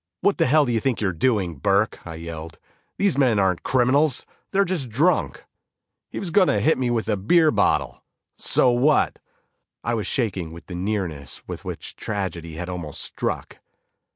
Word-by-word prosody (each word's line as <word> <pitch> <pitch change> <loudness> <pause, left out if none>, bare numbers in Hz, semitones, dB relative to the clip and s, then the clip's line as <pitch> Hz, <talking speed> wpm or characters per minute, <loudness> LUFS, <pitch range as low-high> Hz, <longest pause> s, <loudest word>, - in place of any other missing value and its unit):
"What 200 - +2
the - - +4
hell 150 +2 +4
do 120 - -1
you 115 - +1
think 130 0 -1
you're 100 -4 0
doing, 95 - 0
Burke," 100 +9 +1
I 80 - -6
yelled, 80 0 -8 0.4
"These 195 -8 +2
men 125 -6 +3
aren't 95 -3 +1
criminals; 130 +2 +2 0.2
they're 200 +1 +2
just 170 -9 -1
drunk!" 150 +11 +1 0.6
"He - - -5
was 185 -4 -4
going 185 +1 +5
to 105 - +2
hit 145 +9 +2
me 125 -2 0
with 115 -2 -1
a 110 - +1
beer 155 - +4
bottle." - - 0 0.3
"So 125 - +4
what!" 130 +5 +2 0.6
I 120 - -1
was 110 -4 -1
shaking 95 -9 -1
with 85 0 -11
the 90 - -9
nearness 90 -6 -3
with - - -6
which - - -6
tragedy 85 -6 -4
had 90 +2 -5
almost 90 -5 -5
struck. - - -3
110 Hz, 180 wpm, -23 LUFS, 90-135 Hz, 0.6 s, going